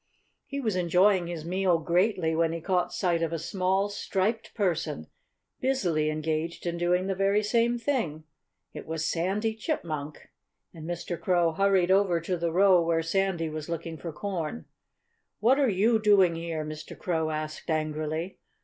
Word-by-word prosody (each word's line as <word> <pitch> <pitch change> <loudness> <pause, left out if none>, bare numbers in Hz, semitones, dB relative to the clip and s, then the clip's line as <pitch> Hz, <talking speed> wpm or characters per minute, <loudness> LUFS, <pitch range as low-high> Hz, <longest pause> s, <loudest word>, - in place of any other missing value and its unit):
He 280 - -4
was 220 -7 -1
enjoying 180 +1 +3
his 165 -2 -5
meal 180 0 +2
greatly 175 0 +1
when 165 0 +1
he 165 - -3
caught 180 +1 0
sight 175 -3 0
of 165 -1 0
a 165 - -1
small, 190 +4 0
striped 210 +2 -2
person 165 - -1 0.5
busily 175 -13 +1
engaged 155 +2 -2
in 170 0 -2
doing 180 +1 +2
the 195 - 0
very 195 +2 +2
same 235 +2 +2
thing. 230 - -2 0.5
It - - -8
was 160 0 -2
Sandy 195 +6 0
Chipmunk! 155 - -4 0.4
And 160 0 -8
Mr. 175 0 -4
Crow 175 -2 +2
hurried 190 0 +2
over 190 -3 +3
to 175 +3 -2
the 170 -1 -1
row 185 0 +5
where 165 0 +1
Sandy 180 -1 0
was 155 0 -6
looking 165 0 -4
for 165 +1 -6
corn. 160 - -4 0.7
"What 250 +6 +4
are 275 -3 +3
you 220 +4 +3
doing 200 -5 +5
here?" 165 -2 -4
Mr. 155 0 -8
Crow 160 -3 -1
asked 155 0 -5
angrily. 155 +2 -2
175 Hz, 160 wpm, -28 LUFS, 160-195 Hz, 0.7 s, row